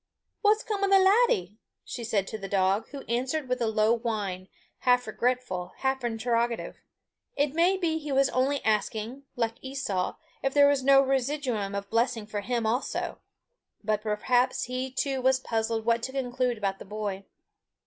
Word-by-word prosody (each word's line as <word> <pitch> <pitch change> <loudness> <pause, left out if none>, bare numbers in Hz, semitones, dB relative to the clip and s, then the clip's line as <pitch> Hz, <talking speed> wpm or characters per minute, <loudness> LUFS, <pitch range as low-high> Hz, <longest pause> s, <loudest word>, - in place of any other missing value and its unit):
"What's 425 +1 +3
come 410 -3 -2
o' - - +4
the 390 - +7
laddie?" 380 - +3 0.3
she 240 - -6
said 215 -4 0
to 220 - -5
the 195 - -5
dog, 195 +2 +1
who 280 -1 -8
answered 260 +5 -2
with 250 0 -1
a 230 - +2
low 215 +1 +3
whine, 210 -6 -3 0.3
half 250 0 +3
regretful, 230 -5 -2
half 265 -1 -1
interrogative. 235 0 -1 0.5
It 285 -1 +1
may 350 +4 +3
be 325 -4 0
he 295 -2 -6
was 270 0 +4
only 270 +2 0
asking, 220 +4 -1
like 230 -1 -1
Esau, 260 -9 -2 0.3
if 270 +1 -1
there 285 0 +7
was 285 -1 +3
no 275 +1 +6
residuum 260 -6 -1
of 200 0 -5
blessing 230 -1 +1
for 210 -1 -4
him 235 +1 -1
also; 240 +5 -1 0.6
but 215 0 0
perhaps 245 +4 +1
he 255 +1 -3
too 265 0 -1
was 260 0 +3
puzzled 225 -2 -1
what 230 0 +2
to 260 - -4
conclude 250 -2 -1
about 195 -2 -2
the - - -9
boy. 200 -1 -4
245 Hz, 170 wpm, -28 LUFS, 215-270 Hz, 0.6 s, the